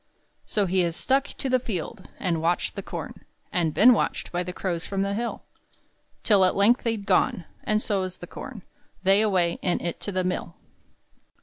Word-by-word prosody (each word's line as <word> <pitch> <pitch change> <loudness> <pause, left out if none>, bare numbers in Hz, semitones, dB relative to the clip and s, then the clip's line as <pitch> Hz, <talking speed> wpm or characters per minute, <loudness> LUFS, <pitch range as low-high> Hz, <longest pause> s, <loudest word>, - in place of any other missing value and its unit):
So 205 -2 +1
he 190 +1 +1
has 170 -2 +1
stuck 270 +7 +1
to 275 - -5
the 255 0 +3
field 210 -3 -5
And 170 -3 -1
watched 170 +2 0
the - - -4
corn, - - -7 0.3
And 170 -3 +1
been 240 +10 +7
watched - - -1
by 175 - -1
the 180 0 -4
crows 175 -2 -3
from 195 -1 -1
the 200 0 -1
hill; 235 +3 -3 0.8
Till 205 -4 +5
at 185 - +3
length 215 +5 +4
they're 230 -1 0
gone, 190 -3 +1 0.2
And 215 0 +2
so 200 -3 0
is 185 -1 -5
the - - -8
corn 220 +2 -9 0.4
They 195 +2 +5
away, 185 -5 +2
and 180 - +1
it 170 - -4
to 205 - -4
the 185 -1 0
mill. 180 -2 -3
190 Hz, 195 wpm, -26 LUFS, 175-215 Hz, 0.8 s, been